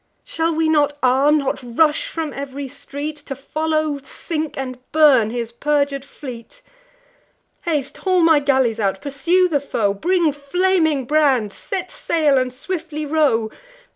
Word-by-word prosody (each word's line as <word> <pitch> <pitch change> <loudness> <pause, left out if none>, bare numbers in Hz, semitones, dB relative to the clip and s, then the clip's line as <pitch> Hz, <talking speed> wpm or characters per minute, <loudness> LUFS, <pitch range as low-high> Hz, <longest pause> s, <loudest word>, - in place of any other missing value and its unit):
Shall 325 0 -1
we 320 0 +1
not 290 -2 +2
arm? 270 +4 +4
not 275 -2 -2
rush 300 - +1
from 325 - -4
ev'ry 275 0 -6
street, 285 +2 -6
To 290 -2 -7
follow, 310 +1 -1
sink, 310 +3 -5
and 255 -2 -5
burn 285 -8 +5
his 235 0 -4
perjur'd 280 +2 0
fleet? 275 - -10 1.0
Haste, 295 -5 -2
haul 370 -2 +1
my 325 -2 +5
galleys 265 -5 +1
out! 195 -2 0
pursue 335 +6 +1
the 295 -5 0
foe! 215 -7 0
Bring 340 - +1
flaming 315 -1 +1
brands! 265 -8 +2
set 370 -2 -5
sail, 300 -5 +2
and 255 0 -1
swiftly 310 +2 -5
row! 280 -8 +1
290 Hz, 140 wpm, -20 LUFS, 265-320 Hz, 1.0 s, burn